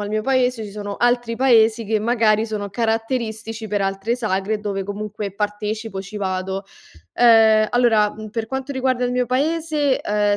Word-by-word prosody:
al 205 Hz, -, -4 dB
mio 215 Hz, 0 st, -1 dB
paese 250 Hz, -3 st, +1 dB
ci 205 Hz, -, -8 dB
sono 205 Hz, 0 st, -6 dB
altri 240 Hz, -1 st, +1 dB
paesi 230 Hz, -3 st, +4 dB
che 215 Hz, +1 st, 0 dB
magari 220 Hz, -1 st, +2 dB
sono 205 Hz, -2 st, -4 dB
caratteristici 225 Hz, -1 st, -2 dB
per 205 Hz, -1 st, 0 dB
altre 195 Hz, +4 st, -1 dB
sagre, 210 Hz, -2 st, -1 dB
dove 200 Hz, -2 st, -3 dB
comunque 205 Hz, +1 st, -5 dB
partecipo, 210 Hz, 0 st, -3 dB
ci 200 Hz, +2 st, -9 dB
vado. 190 Hz, 0 st, -3 dB, 0.5 s
Ehm, 220 Hz, -2 st, +5 dB
allora, 225 Hz, -4 st, +3 dB
mhmm, 215 Hz, 0 st, -9 dB
per 225 Hz, +1 st, -3 dB
quanto 265 Hz, +2 st, -4 dB
riguarda 255 Hz, -2 st, 0 dB
il 245 Hz, -, -1 dB
mio 250 Hz, -1 st, 0 dB
paese, 300 Hz, +1 st, 0 dB
ehm, 205 Hz, 0 st, +1 dB
220 Hz, 170 wpm, -21 LUFS, 205-245 Hz, 0.5 s, Ehm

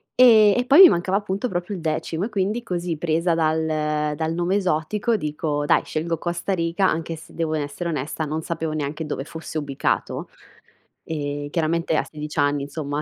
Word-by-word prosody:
E 220 Hz, -5 st, +7 dB
e 245 Hz, -, +1 dB
poi 285 Hz, +8 st, +8 dB
mi 370 Hz, -, +11 dB
mancava 185 Hz, +3 st, +1 dB
appunto 205 Hz, +3 st, -3 dB
proprio 180 Hz, +2 st, -3 dB
il 175 Hz, -, -7 dB
decimo 160 Hz, +3 st, -2 dB
e 230 Hz, -, -5 dB
quindi 210 Hz, +3 st, -1 dB
così 175 Hz, -5 st, -3 dB
presa 165 Hz, +2 st, +1 dB
dal 155 Hz, -2 st, 0 dB
dal 160 Hz, +1 st, -2 dB
nome 175 Hz, +3 st, 0 dB
esotico 200 Hz, +5 st, 0 dB
dico: 150 Hz, -2 st, -2 dB
"Dai, -, -, +3 dB
scelgo 165 Hz, +1 st, -2 dB
Costa 175 Hz, +4 st, -2 dB
Riga". 175 Hz, +2 st, +1 dB
anche 165 Hz, +1 st, -2 dB
se 160 Hz, -, -14 dB
devo 160 Hz, -2 st, -1 dB
n 155 Hz, -, -1 dB
essere 145 Hz, +4 st, -4 dB
onesta, 155 Hz, +1 st, -3 dB
non 155 Hz, +2 st, -3 dB
sapevo 160 Hz, -1 st, -3 dB
neanche 155 Hz, +1 st, -3 dB
dove 145 Hz, -2 st, -4 dB
fosse 160 Hz, +1 st, -7 dB
ubicato, 140 Hz, -2 st, -2 dB, 0.7 s
e 145 Hz, -2 st, -4 dB
chiaramente 165 Hz, 0 st, 0 dB
a -, -, +1 dB
16 150 Hz, -1 st, -6 dB
anni, 145 Hz, 0 st, +2 dB
insomma, 145 Hz, 0 st, -4 dB
160 Hz, 185 wpm, -23 LUFS, 150-180 Hz, 0.7 s, mi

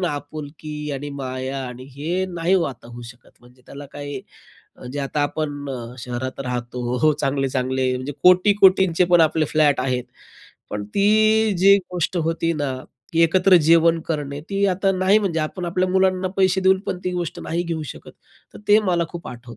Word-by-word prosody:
ना, 180 Hz, -, 0 dB
आपुलकी 150 Hz, +1 st, -7 dB
आणि 145 Hz, +1 st, -6 dB
माया 130 Hz, +1 st, -4 dB
आणि 125 Hz, +1 st, -9 dB
हे 175 Hz, +6 st, -1 dB
नाही 170 Hz, +3 st, +1 dB
हो 180 Hz, -, +3 dB
आता 115 Hz, -, -17 dB
होऊ 120 Hz, 0 st, -10 dB
शकत, 120 Hz, -, -25 dB
म्हणजे 125 Hz, +1 st, -21 dB
त्याला 140 Hz, 0 st, -10 dB
काही 145 Hz, -2 st, -6 dB, 0.7 s
जे 145 Hz, -, -5 dB
आता 145 Hz, +1 st, -2 dB
आपण 145 Hz, -1 st, -3 dB, 0.3 s
शहरात 125 Hz, +2 st, -5 dB
राहतो 125 Hz, -1 st, -4 dB
हो, 125 Hz, -, -1 dB
हो, 155 Hz, -, +5 dB
चांगले-चांगले 130 Hz, -2 st, -1 dB
म्हणजे 130 Hz, +3 st, -5 dB
कोटी-कोटींचे 185 Hz, -1 st, +5 dB
पण 175 Hz, -, +7 dB
आपले 160 Hz, 0 st, +3 dB
फ्लॅट 145 Hz, -4 st, +3 dB
आहेत, 125 Hz, -1 st, -1 dB, 0.7 s
पण 105 Hz, 0 st, -4 dB
ती 215 Hz, +2 st, +3 dB
जी 195 Hz, +2 st, +7 dB, 0.2 s
गोष्ट 180 Hz, +1 st, -2 dB
होती 165 Hz, +1 st, 0 dB
ना, 145 Hz, -4 st, -2 dB, 0.4 s
की 165 Hz, -, +2 dB
एकत्र 185 Hz, +3 st, +5 dB
जेवण 165 Hz, 0 st, +4 dB
करणे, 145 Hz, -3 st, -3 dB
ती 200 Hz, 0 st, 0 dB
आता 195 Hz, +1 st, +1 dB
नाही. 190 Hz, +3 st, +3 dB
म्हणजे 190 Hz, -6 st, -1 dB
आपण 155 Hz, +4 st, -4 dB
आपल्या 185 Hz, +2 st, 0 dB
मुलांना 185 Hz, 0 st, +1 dB
पैसे 190 Hz, 0 st, +2 dB
देऊन 190 Hz, 0 st, +3 dB
पण 180 Hz, -, -2 dB
ती 180 Hz, -, 0 dB
गोष्ट 175 Hz, -2 st, -4 dB
नाही 170 Hz, +2 st, -2 dB
घेऊ 165 Hz, -2 st, -4 dB
शकत, -, -, -14 dB, 0.4 s
तर -, -, -10 dB
ते 210 Hz, +1 st, +7 dB
मला 170 Hz, -2 st, +1 dB
खूप 175 Hz, -1 st, -8 dB
आठवतं. 120 Hz, -2 st, -11 dB
155 Hz, 180 wpm, -21 LUFS, 135-185 Hz, 0.7 s, पण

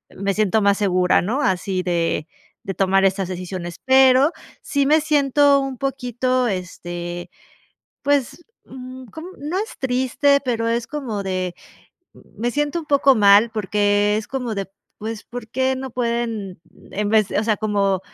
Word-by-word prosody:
me 195 Hz, 0 st, -1 dB
siento 215 Hz, 0 st, +2 dB
más 200 Hz, 0 st, +3 dB
segura, 185 Hz, -3 st, +2 dB
¿no?, 250 Hz, +9 st, -1 dB
así 185 Hz, -2 st, 0 dB
de 170 Hz, -3 st, -1 dB, 0.3 s
de 195 Hz, -, -5 dB
tomar 195 Hz, 0 st, +3 dB
estas 190 Hz, -1 st, +1 dB
decisiones. 180 Hz, -1 st, -6 dB
Pero 265 Hz, +3 st, +5 dB, 0.3 s
sí 280 Hz, -1 st, 0 dB
me 305 Hz, +2 st, +4 dB
siento 285 Hz, -2 st, +3 dB
un 270 Hz, -3 st, -5 dB
poquito 255 Hz, -1 st, -1 dB
este, 175 Hz, -2 st, -5 dB, 0.7 s
pues, 285 Hz, +3 st, 0 dB, 0.2 s
mm, 255 Hz, 0 st, -10 dB
como, 320 Hz, -, -10 dB
no 305 Hz, +7 st, -3 dB
es 435 Hz, +3 st, -5 dB
triste, 260 Hz, +2 st, +2 dB
pero 230 Hz, -2 st, -1 dB
es 230 Hz, 0 st, -1 dB
como 235 Hz, -9 st, -4 dB
de 185 Hz, -2 st, -2 dB, 0.6 s
me 225 Hz, +5 st, -5 dB
siento 295 Hz, +5 st, -1 dB
un 310 Hz, -, -12 dB
poco 275 Hz, -2 st, +4 dB
mal 205 Hz, +1 st, +6 dB
porque, 205 Hz, 0 st, +1 dB
es 215 Hz, -, -3 dB
como 250 Hz, -5 st, -3 dB
de, 195 Hz, -1 st, -4 dB, 0.3 s
pues, 220 Hz, 0 st, -6 dB
¿por 245 Hz, -2 st, -8 dB
qué 260 Hz, +2 st, 0 dB
no 265 Hz, 0 st, -6 dB
pueden 235 Hz, -6 st, -2 dB, 0.3 s
en 205 Hz, +1 st, -2 dB
vez 215 Hz, -2 st, +3 dB
de?, -, -, -1 dB
o 215 Hz, -, 0 dB
sea, 215 Hz, -2 st, +1 dB
como 200 Hz, -3 st, 0 dB
225 Hz, 160 wpm, -21 LUFS, 195-265 Hz, 0.7 s, mal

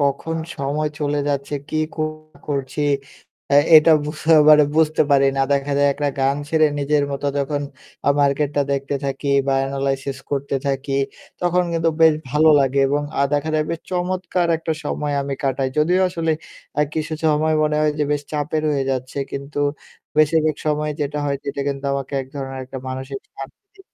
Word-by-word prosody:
কখন 140 Hz, +3 st, 0 dB, 0.2 s
সময় 145 Hz, +2 st, -1 dB
চলে 145 Hz, -1 st, 0 dB
যাচ্ছে, 140 Hz, +1 st, -2 dB
কে 155 Hz, -, -3 dB, 0.2 s
কো 155 Hz, -, -2 dB, 0.4 s
করছি 140 Hz, 0 st, -3 dB, 0.7 s
এ্যা 140 Hz, -, +6 dB, 0.2 s
এটা 155 Hz, +1 st, +7 dB
বুঝ 150 Hz, +1 st, -5 dB, 0.3 s
মানে 150 Hz, -1 st, +8 dB
বুঝতে 160 Hz, -1 st, +3 dB
পারি 140 Hz, -1 st, +5 dB
না। -, -, +1 dB
দেখা 140 Hz, 0 st, 0 dB
যায় 145 Hz, -, +4 dB
একটা 145 Hz, +1 st, -1 dB
গান 135 Hz, +1 st, +2 dB
ছেড়ে 155 Hz, 0 st, +4 dB
নিজের 145 Hz, +1 st, +1 dB
মত 140 Hz, 0 st, -4 dB, 0.2 s
যখন 145 Hz, +1 st, -1 dB, 0.4 s
আ -, -, +5 dB
মার্কেটটা 145 Hz, 0 st, +1 dB
দেখতে 140 Hz, +1 st, -2 dB
থাকি 140 Hz, +1 st, -3 dB, 0.2 s
বা 135 Hz, -, +2 dB
এনালাইসিস 135 Hz, 0 st, -2 dB
করতে 140 Hz, 0 st, -2 dB
থাকি। 135 Hz, 0 st, -2 dB, 0.5 s
তখন 180 Hz, 0 st, +2 dB
কিন্তু 165 Hz, 0 st, +1 dB
বেশ 160 Hz, -1 st, +7 dB, 0.2 s
ভালো 150 Hz, +3 st, +4 dB
লাগে। 135 Hz, 0 st, +1 dB
এবং 145 Hz, +1 st, 0 dB, 0.2 s
আ -, -, +4 dB
দেখা 145 Hz, +2 st, 0 dB
যায় 155 Hz, -, +3 dB, 0.3 s
চমৎকার 180 Hz, -1 st, -1 dB
একটা 160 Hz, 0 st, -3 dB
সময় 145 Hz, 0 st, -2 dB
আমি 140 Hz, 0 st, -3 dB
কাটাই। 135 Hz, 0 st, 0 dB
যদিও 175 Hz, +5 st, +3 dB
আসলে 165 Hz, -2 st, -2 dB, 0.5 s
আ -, -, +4 dB
কিছু 155 Hz, 0 st, -3 dB
সময় 155 Hz, +1 st, +2 dB
মনে 150 Hz, 0 st, +1 dB
হয় 155 Hz, 0 st, +3 dB
যে 150 Hz, -, +2 dB
বেশ 145 Hz, -1 st, -1 dB
চাপের 150 Hz, +1 st, -1 dB
হয়ে 140 Hz, -2 st, 0 dB
যাচ্ছে। 130 Hz, +1 st, -3 dB
কিন্তু 140 Hz, +1 st, -5 dB, 0.6 s
বেশিরভাগ 155 Hz, 0 st, +3 dB
সময় 150 Hz, 0 st, 0 dB
যেটা 145 Hz, 0 st, -2 dB
হয় 140 Hz, -1 st, 0 dB
সেটা 140 Hz, 0 st, -3 dB
কিন্তু 140 Hz, 0 st, -4 dB
আমাকে 140 Hz, 0 st, -4 dB
এক -, -, -12 dB
ধরনের 135 Hz, -1 st, -5 dB
একটা 130 Hz, +1 st, -7 dB
মানুষিক 130 Hz, +1 st, -5 dB, 0.2 s
শান্তি 395 Hz, -, -11 dB
145 Hz, 175 wpm, -21 LUFS, 140-155 Hz, 0.7 s, মানে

